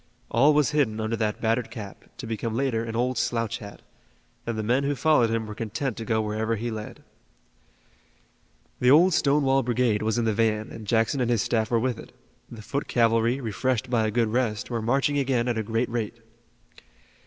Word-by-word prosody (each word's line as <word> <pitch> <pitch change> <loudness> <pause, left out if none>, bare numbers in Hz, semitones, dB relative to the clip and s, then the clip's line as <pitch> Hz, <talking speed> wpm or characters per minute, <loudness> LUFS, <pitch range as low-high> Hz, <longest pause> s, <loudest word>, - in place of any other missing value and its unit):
All 140 +6 +4
was 150 -1 +3
hidden 135 -8 +1
under 110 +1 -1
that 105 -1 -1
battered 115 +1 0
cap 105 -4 -9
to 130 - -7
become 115 0 -3
later 120 -3 0
an 115 -1 -5
old 125 +1 0
slouch 115 -2 -1
hat, 100 -2 -11 0.6
and 115 -1 -2
the 110 - -2
men 125 +5 +1
who 140 +1 0
followed 145 -5 +3
him 115 0 -1
were 105 - -7
content 115 +3 -3
to 115 - -5
go 110 -1 +1
wherever 110 +2 -1
he 115 +2 -3
led. 110 -1 -7 1.8
The 125 - +3
old 170 +7 +6
Stonewall 140 -3 +3
Brigade 120 -3 +1
was 110 +1 0
in 120 - +1
the 110 - +1
van 110 -1 0
and 110 -2 -9
Jackson 115 +5 +1
and 120 - 0
his 115 -4 +2
staff 110 -1 0
were 115 - +2
with 125 0 -1
it. - - -12 0.4
The 110 -2 -10
foot 140 +6 -3
cavalry 115 +1 +2
refreshed 125 +1 -2
by 115 -3 +2
a - - 0
good 115 0 +1
rest 120 0 -1
were 115 -1 -1
marching 135 +5 +1
again 130 -3 0
at 120 -2 0
a - - +1
great 115 +3 -1
rate. 115 -2 -3
115 Hz, 200 wpm, -25 LUFS, 110-125 Hz, 1.8 s, old